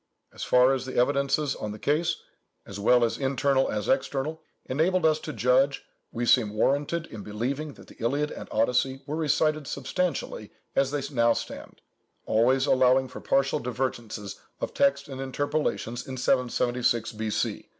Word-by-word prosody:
As - - -11
far 125 +1 +5
as 130 -1 -3
the 130 - -6
evidences 140 +2 +1
on 105 -1 -5
the - - -8
case, 155 +8 +1 0.5
as 100 0 -8
well 120 +4 +4
internal 135 +2 +1
as 105 -2 -2
external, 135 +3 -1 0.2
enable 165 +6 +1
us 155 -1 +3
to 155 - -6
judge, 130 +3 +2 0.3
we 120 +1 -2
seem 105 -2 +3
warranted 145 +8 +1
in 110 -8 -9
believing 130 +9 -3
that - - -15
the - - -16
Iliad 145 +5 0
and - - -8
Odyssey 125 +4 +1
were 150 +1 -3
recited 155 -1 +1
substantially 175 +4 -3 0.2
as 135 -1 +3
they 145 -1 -2
now 115 -2 +4
stand - - -7 0.4
(always 130 +5 +3
allowing 130 -1 +4
for - - -9
partial 135 +2 +1
divergences 120 -5 -4 0.2
of - - -4
text 140 +1 +2
and 135 -1 -6
interpolations) 135 -3 -2
in 130 -1 -5
776 120 -2 +1
B.C. 110 -1 -3
130 Hz, 155 wpm, -27 LUFS, 120-145 Hz, 0.5 s, far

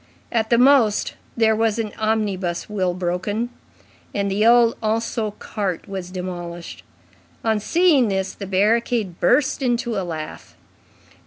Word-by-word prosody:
At 220 -2 0
the 235 - +4
most 250 -4 +4 0.2
there 220 -1 +4
was 225 0 +1
an 220 -2 -2
omnibus 205 -5 -1
wheel 185 -4 -1
broken, 190 +6 -2 0.6
and 200 -1 0
the 205 +2 +1
old 235 -1 +5
Anceau 220 -1 -1
cart 195 -4 -4
was 190 -2 -5
demolished. 175 -2 -6 0.6
On 220 -2 +1
seeing 315 - +3
this, 190 -1 -1
the 200 - -7
barricade 210 0 +1
burst 260 +9 +2
into 240 -2 0
a - - -1
laugh. 160 -4 -7
210 Hz, 135 wpm, -22 LUFS, 185-230 Hz, 0.6 s, old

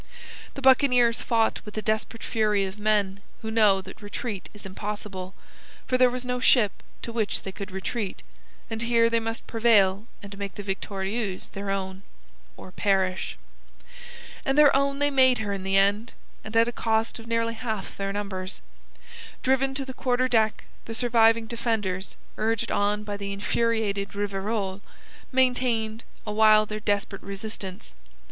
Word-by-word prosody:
The 275 - -7
buccaneers 250 -3 +5
fought 225 -2 +1
with 210 -1 -10
the 215 - -2
desperate 220 +2 -1
fury 210 -3 +1
of 190 +2 -7
men 205 -2 +1 0.2
who 220 - -3
know 210 -4 +4
that 190 +3 -12
retreat 205 -1 -5
is 210 -1 -14
impossible, 195 -1 -6 0.5
for 255 - 0
there 255 0 +6
was 250 0 -4
no 250 0 -1
ship 235 -5 +5 0.3
to 230 - -5
which 220 -3 -1
they 195 - -5
could 200 +1 -7
retreat, 190 +2 -4 0.4
and 225 0 -4
here 230 0 +3
they 230 - +3
must 225 0 -4
prevail 220 -3 +3 0.2
and 200 0 -8
make 200 -1 -5
the 205 - -6
Victorieuse 195 +1 -3
their 200 0 -5
own, 190 -1 -3 0.6
or 185 - -11
perish. 190 -1 0 1.1
And 270 +1 0
their 295 -2 +7
own 275 0 +2
they 290 0 +2
made 260 -2 +5
her 205 -2 -2
in 195 - -4
the 195 +1 +1
end, 205 +4 +2 0.3
and 215 +1 -3
at 230 +1 +5
a - - -1
cost 225 0 0
of 225 - -11
nearly 230 0 0
half 220 -4 -4
their 195 0 -3
numbers. 195 -2 -4 0.8
Driven 265 +1 +2
to 275 0 -1
the 260 - -7
quarter 255 0 +1
deck, 220 -3 +2 0.2
the 225 - -5
surviving 230 -1 +4
defenders, 220 -5 -2 0.2
urged 225 0 0
on 205 +1 +1
by 205 -1 -4
the 200 0 -5
infuriated 205 -1 -1
Rivarol, 200 0 -2 0.5
maintained 245 -4 +1 0.2
awhile 215 0 +5
their 215 0 -5
desperate 205 -1 -1
resistance. 195 - -7
215 Hz, 160 wpm, -26 LUFS, 200-230 Hz, 1.1 s, their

